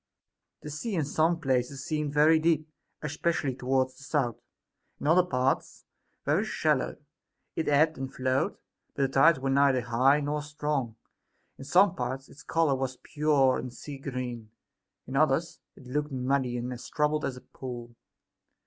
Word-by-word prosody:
The 150 - -6
sea 190 +8 -3
in 160 -4 +1
some 160 +4 +1
places 130 -2 -1
seemed 150 -2 -1
very 155 +2 +5
deep, 155 -1 +2 0.4
especially 150 -2 -1
toward 130 +1 +1
the 130 +1 -18
south, 140 -6 -1 0.6
in - - -6
other 165 +4 +6
parts 130 -6 -1 0.4
very - - +2
shallow; - - 0 0.6
it 160 - -2
ebbed 150 +1 +3
and 135 0 -4
flowed, 130 0 0 0.4
but 140 - +1
the - - +3
tides 135 +3 +5
were 135 0 -1
neither 135 -2 +4
high 125 +5 +3
nor 150 +1 -1
strong; 150 -5 -2 0.6
in 135 - -8
some 175 +5 +5
parts 135 -5 -4
its 145 - -14
color 165 -3 +1
was 130 -1 -2
pure 145 -4 +2
and 125 -1 -7
sea 140 +2 -8
green, 125 -4 -5 0.6
in 130 - -6
others 160 +3 +2 0.2
it 135 - -15
looked 150 +4 -2
muddy 130 -1 0
and 125 +1 -3
as 120 - -9
troubled 150 0 +1
as 130 - -2
a - - -10
pool. 120 -2 -8
140 Hz, 160 wpm, -28 LUFS, 130-150 Hz, 0.6 s, other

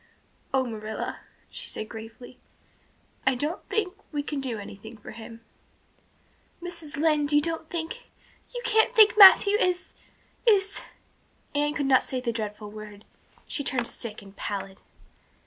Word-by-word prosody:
"Oh, 265 -1 +2
Marilla," 220 -2 -5 0.3
she - - -6
said 215 - -4
gravely. 225 +3 -10 0.9
"I 265 - +4
don't 300 +7 -3
think 405 -5 0 0.2
we 295 -2 -2
can 290 -1 -3
do 250 -4 -3
anything 205 +2 -10
for 210 - -11
him." 230 +1 -10 1.2
"Mrs. 335 -5 -8
Lynde, 300 -1 +2
you 295 - +7
don't 325 +1 -3
think 345 +9 -5 0.4
you 485 -1 -6
can't 445 -1 +3
think 435 -1 +7
Matthew 405 0 +9
is 360 0 0 0.5
is 400 -3 +3 0.4
" - - -37
Anne 295 +1 +1
could 285 - -1
not 265 -1 +5
say 260 - -4
the 245 -2 -1
dreadful 210 -1 -5
word; 210 -1 -10 0.4
she 285 - -3
turned 245 -2 0
sick 215 -3 -6
and 195 0 -15
pallid. 195 -1 -5
270 Hz, 145 wpm, -27 LUFS, 220-335 Hz, 1.2 s, Matthew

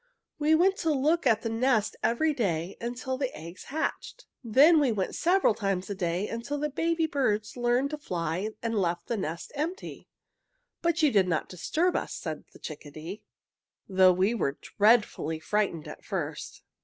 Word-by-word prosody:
We 305 +1 +4
went 380 +4 +3
to 325 - 0
look 300 +2 +2
at 225 -2 +3
the 230 - -1
nest 225 -2 +1
every 305 +7 +2
day 180 - -1
until 255 +2 -3
the 265 -3 -1
eggs 170 +3 -10
hatched. 315 - -4 0.2
Then 280 +8 +6
we 280 -5 +3
went 195 -4 -2
several 360 - +3
times 195 -2 -2
a - - 0
day 180 +1 -1
until 235 +6 -4
the 300 +1 -2
baby 330 +3 +1
birds 215 -9 0
learned 245 +3 +1
to 300 - -4
fly 175 - -2
and 230 -1 -1
left 175 -1 -1
the 235 - -2
nest 170 -5 -4
empty. 330 +8 -5 0.7
"But 335 -1 +1
you 300 - +5
did 195 -3 +4
not 165 -3 -1
disturb 315 - 0
us," - - -2
said - - -5
the - - -15
chickadee, 155 +5 -8 0.7
"though 185 -1 +6
we 190 +5 +2
were 140 -11 -1
dreadfully 210 -7 +2
frightened 190 -3 -1
at - - -10
first." - - -5
230 Hz, 170 wpm, -28 LUFS, 185-295 Hz, 0.7 s, Then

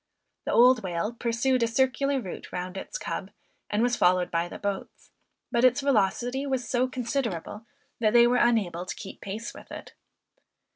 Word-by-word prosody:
The - - -1
old 245 0 +6
whale 185 +4 -2
pursued 240 +2 0
a 230 - +3
circular 265 +3 +1
route 190 -8 -8
round 180 +1 -5
its 340 - -5
cub, - - -5 0.4
and 210 +2 +1
was 245 0 +2
followed 180 -2 +3
by 170 0 0
the - - -8
boats; 200 -2 -5 0.4
but 240 0 +1
its 255 +2 +5
velocity 245 +2 +1
was 260 -3 -1
so 255 -1 +1
considerable, 235 - -3 0.3
that 215 -2 +3
they 235 0 +7
were 245 +1 +3
unable 205 -9 +2
to - - -4
keep 195 - -9
pace 215 +4 -5
with - - -13
it. - - -9
235 Hz, 175 wpm, -27 LUFS, 195-255 Hz, 0.4 s, they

